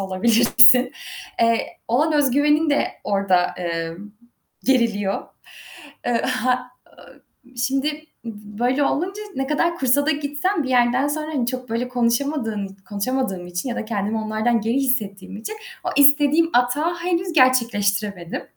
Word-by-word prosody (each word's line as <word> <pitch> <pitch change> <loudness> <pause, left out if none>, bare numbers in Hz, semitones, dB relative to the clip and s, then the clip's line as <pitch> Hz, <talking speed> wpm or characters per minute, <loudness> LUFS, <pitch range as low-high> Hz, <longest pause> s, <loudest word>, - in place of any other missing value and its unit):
olabilirsin?" 240 +6 +5 0.5
Eee, 230 0 +2 0.2
olan 300 +7 +1
öz 290 -3 +2
güvenin 295 +3 +2
de 285 - +1 0.2
orada, 195 -3 +2
emm, 170 +3 -5 0.5
geriliyor. 225 -7 +1 0.8
Eee, 240 -1 0
ha 250 0 -1 0.3
ııı, - - -17 0.4
şimdi 270 +3 -1 0.4
b 210 -2 -10
böyle 260 +4 +1
olunca 380 +9 -2
ne 270 0 -2
kadar 335 +4 0
kursa 275 +2 +2
da - - +3
gitsem 300 +4 -1
bir 260 - -4
yerden 250 +2 +2
sonra, 305 +1 -3
hani, 245 -4 -1
çok, 255 -1 -4
böyle, 235 +2 -2
konuşamadığın 235 -3 -1
i 195 - -34
konuşamadığım 205 -3 -3
için 180 +7 -4
ya 240 - -4
da - - -3
kendimi 215 0 -2
onlardan 220 +2 0
geri 225 +3 -1
hissettiğim 210 -8 -2
için 330 - -7 0.3
o - - -1
istediğim 290 +3 +5
atağı 290 +8 +1
henüz 350 0 -2
gerçekleştiremedim. 205 - +1
245 Hz, 140 wpm, -21 LUFS, 210-285 Hz, 0.8 s, olabilirsin